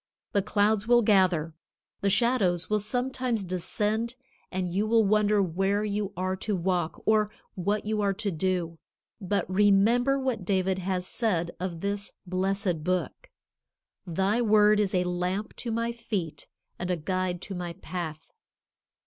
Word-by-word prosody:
The 200 - +2
clouds 210 +1 +1
will 240 0 +5
gather. 185 -6 +3 0.5
The 200 - +2
shadows 200 -5 +2
will 210 - +3
sometimes 245 0 -1
descend 210 +6 -1 0.4
and 185 -1 -1
you 205 +3 +1
will 225 0 +4
wonder 210 0 +3
where 195 +4 0
you 205 -1 -2
are 185 +1 -1
to 210 +2 -1
walk, 175 -2 -1
or 215 -1 +3 0.2
what 200 +3 -1
you 215 0 0
are 200 -1 +1
to 210 0 -2
do. 170 -1 -1 0.4
But 200 +1 -1
remember 210 +7 +4
what 260 -7 -2
David 190 0 +1
has 185 -1 -2
said 180 -7 0
of 175 -2 -4
this 200 0 -3
blessed 185 -2 -1
Book: 185 - -2 0.8
"Thy 195 +7 +1
word 210 -2 +5
is 200 -2 +1
a 180 - +3
lamp 180 +3 -2
to 240 - -5
my 230 +1 0
feet 210 -9 -4 0.3
and 175 - -3
a 180 - +1
guide 185 +2 -2
to 200 - -6
my 175 -2 -4
path." 165 -4 -6
195 Hz, 150 wpm, -27 LUFS, 180-215 Hz, 0.8 s, will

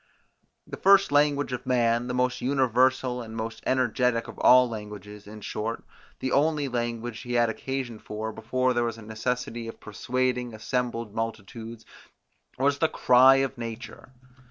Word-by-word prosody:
The - - -8
first 195 -2 +5
language 145 -1 +2
of 125 - -5
man, 120 -1 +2
the 125 - -3
most 125 0 0
universal 130 -1 +2
and 110 -1 -9
most 110 0 -5
energetic 125 -2 +1
of - - -10
all 125 0 +7
languages, 105 -2 -9
in 105 0 -10
short, 110 +3 -4 0.3
the 130 - -3
only 150 0 +2
language 120 -2 -3
he 120 +4 -6
had 120 -1 +3
occasion 130 -2 -5
for, 110 +1 -5
before 130 +4 0
there 120 0 +1
was 115 -1 -3
a 115 - -11
necessity 115 +1 -3
of 115 - -9
persuading 125 +2 -2
assembled 115 -1 -3
multitudes, 115 +1 -6 0.7
was 140 +2 +1
the 160 - +2
cry 130 +2 +6
of 135 -2 -8
nature. 115 +2 -7
120 Hz, 155 wpm, -26 LUFS, 115-130 Hz, 0.7 s, all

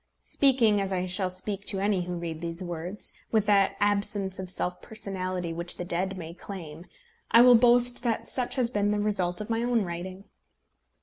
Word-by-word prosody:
Speaking, 235 -7 +3
as 195 0 -3
I 185 -1 -1
shall 185 +1 +3
speak 195 +2 -5
to 195 - 0
any 195 -2 0
who 180 - -5
may - - -5
read 160 0 -7
these 170 +2 -3
words, 175 +3 -2 0.2
with 220 -2 +2
that 200 -1 +3
absence 200 -2 0
of 185 -1 -5
self 180 0 -3
personality 185 -5 -4
which 170 +1 +2
the 175 - -4
dead 185 +2 -2
may 165 -2 -7
claim, 170 -3 -9 0.4
I 230 +1 +7
will 250 0 +8
boast 245 +1 +4
that 235 -2 -2
such 250 -2 0
has 250 -3 0
been 205 -2 0
the 210 0 0
result 195 -3 -1
of 210 - -7
my 225 0 0
own 240 -2 +1
writing. 185 +2 -6
195 Hz, 195 wpm, -27 LUFS, 180-215 Hz, 0.4 s, will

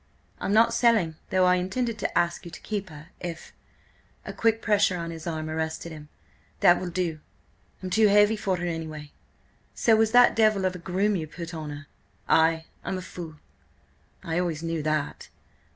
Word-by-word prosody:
"I'm - - -2
not 230 +2 +5
selling, 225 -10 +2
though 185 -1 +3
I 180 0 +4
intended 220 +5 -2
to - - -2
ask 170 0 0
you 175 - -8
to 170 - -10
keep 205 -3 -4
her, 155 +1 -12
if—" 170 -2 -7 0.7
A - - -6
quick 225 0 +2
pressure 205 -4 +2
on 170 -1 -4
his 165 0 -8
arm 155 -2 -3
arrested 160 +1 -3
him. 150 -1 -10 0.5
"That 175 - +6
will 185 - -4
do! 170 -3 -2 0.6
I'm 185 - -4
too 220 +2 +5
heavy 205 +2 +5
for 195 -3 -1
her 175 - -3
anyway." 155 -3 -5 0.6
"So 225 - +4
was 220 0 +2
that 245 +1 +6
devil 215 -3 +3
of 185 - +1
a - - -7
groom 195 +4 0
you 160 -4 -3
put 170 +2 -8
on 155 -2 -5
her." 145 0 -8 0.4
"Ay. 160 0 +3 0.2
I'm 190 - -3
a - - -5
fool." 170 -4 -8 0.9
"I 165 +1 -1
always 165 -3 -2
knew 165 -1 -2
that." 155 -1 -2
175 Hz, 185 wpm, -26 LUFS, 160-205 Hz, 0.9 s, That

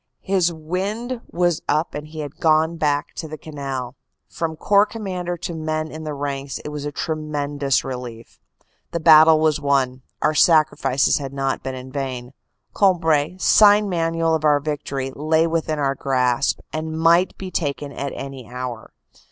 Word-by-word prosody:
His 185 -3 +2
wind 200 +10 -4
was 175 -2 0
up 155 +3 +1
and 150 +1 -6
he 155 0 -7
had 145 -1 -7
gone 160 +1 +3
back 145 -1 0
to 160 - -6
the 155 0 -7
canal. 135 -5 -6 0.3
From 160 -1 -4
Corps 200 +5 +3
Commander 185 -6 -4
to 170 - -5
the 160 - -6
men 155 0 -2
in 155 0 -8
the 150 -1 -4
ranks 140 -1 -4
it - - -7
was 150 -1 -5
a 145 - -3
tremendous 145 -3 -1
relief. 125 -3 -8 0.5
The 170 - 0
battle 160 0 +7
was 155 -1 +2
won; 135 -3 +1 0.2
our 155 - +2
sacrifices 155 -4 +3
had 135 -1 -6
not 135 -1 -1
been 130 0 -5
in 130 0 -9
vain. 130 -2 -5 0.4
Cambrai, 165 -4 +2
sign 205 +1 +5
manual 165 -2 0
of 160 -1 0
our 150 -1 +4
victory, 140 -2 -4
lay 160 +2 +2
within 160 -2 -1
our 140 -2 +1
grasp 130 -1 0
and 160 0 -3
might 170 +3 +3
be 185 -1 -7
taken 145 -3 -2
at 140 0 -4
any 135 -4 -8
hour. 125 -2 -6
155 Hz, 170 wpm, -21 LUFS, 140-165 Hz, 0.5 s, battle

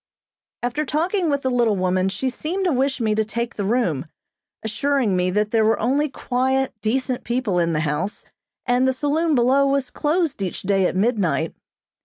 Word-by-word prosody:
After 245 +5 -1
talking 335 +5 0
with 280 -1 0
the 260 - 0
little 235 -4 +2
woman 185 0 +1
she 205 +7 -2
seemed 360 +9 -3
to 355 - +2
wish 265 0 0
me 220 -2 +1
to 220 +1 +1
take 235 +2 -3
the 205 - -2
room, 195 - 0 0.6
assuring 240 -1 0
me 180 0 +1
that 210 +3 0
there 225 -1 +3
were 220 +1 +2
only 280 +6 +1
quiet, 265 +1 0
decent 255 +3 -1
people 235 -7 0
in 170 -1 +1
the 155 - 0
house, 150 +6 -2 0.4
and 250 +1 +2
the 260 - +2
saloon 300 +4 +1
below 265 +3 +4
was 275 -2 0
closed 310 - 0
each 185 -2 -3
day 195 -2 +2
at - - -4
midnight. 185 - +1
245 Hz, 185 wpm, -22 LUFS, 200-275 Hz, 0.6 s, below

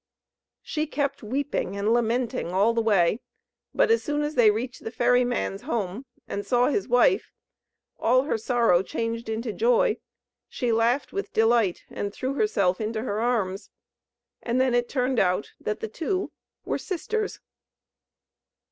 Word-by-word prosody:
She 310 -1 -2
kept 280 -2 -2
weeping 255 -4 -2
and 210 +3 +1
lamenting 240 0 0
all 200 +5 +3
the 230 - +1
way; 205 -2 +3 0.5
but - - +3
as 460 - +4
soon 295 0 -1
as 295 +1 -2
they 240 -6 +6
reached 240 +4 -3
the - - -4
ferry 245 +2 +3
man's 245 -5 -2
home, 235 - -3 0.2
and 200 - -4
saw 245 +3 +2
his 395 +6 -1
wife, 245 +10 +3 0.7
all 255 +3 +3
her 285 - -1
sorrow 230 -5 +2
changed 230 +3 -4
into 220 0 -3
joy; 485 -1 +2 0.5
she 245 -3 -1
laughed 230 +4 +1
with 400 +1 -3
delight, 225 -4 +2
and 205 - -3
threw 260 +1 -2
herself 210 - +1
into 220 +1 -2
her 210 -4 -2
arms. 215 -5 -1 0.7
And 240 +1 -1
then 260 -1 +2
it 240 0 +1
turned 255 -2 0
out 185 +2 +1
that 210 +1 -3
the - - -2
two 370 - -2 0.3
were - - -1
sisters. 410 +4 -3
240 Hz, 155 wpm, -26 LUFS, 220-270 Hz, 0.7 s, they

